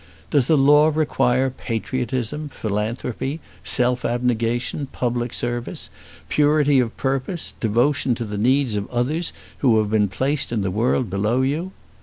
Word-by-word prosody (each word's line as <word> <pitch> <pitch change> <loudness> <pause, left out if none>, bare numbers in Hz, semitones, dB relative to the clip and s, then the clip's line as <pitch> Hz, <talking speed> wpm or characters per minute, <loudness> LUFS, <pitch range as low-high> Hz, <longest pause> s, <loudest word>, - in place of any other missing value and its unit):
Does 140 -4 +3
the 160 - +4
law 150 +3 +5
require 135 -4 +1
patriotism, 130 +4 -3
philanthropy, 115 +6 -3 0.2
self 125 0 +1
abnegation, 120 +3 -1
public 120 -2 -2
service, 120 0 -4 0.4
purity 145 - +3
of 120 -2 -1
purpose, 135 +6 -2
devotion 120 +3 +1
to 120 - -4
the 105 -1 -4
needs 130 0 +2
of 100 -1 -3
others 140 +8 -1 0.3
who 120 -5 +4
have 105 -1 +1
been 105 -2 +3
placed 135 +9 0
in 110 -4 0
the 95 - -1
world 115 +1 0
below 105 +6 +1
you? 155 +8 -1
125 Hz, 140 wpm, -22 LUFS, 115-140 Hz, 0.4 s, law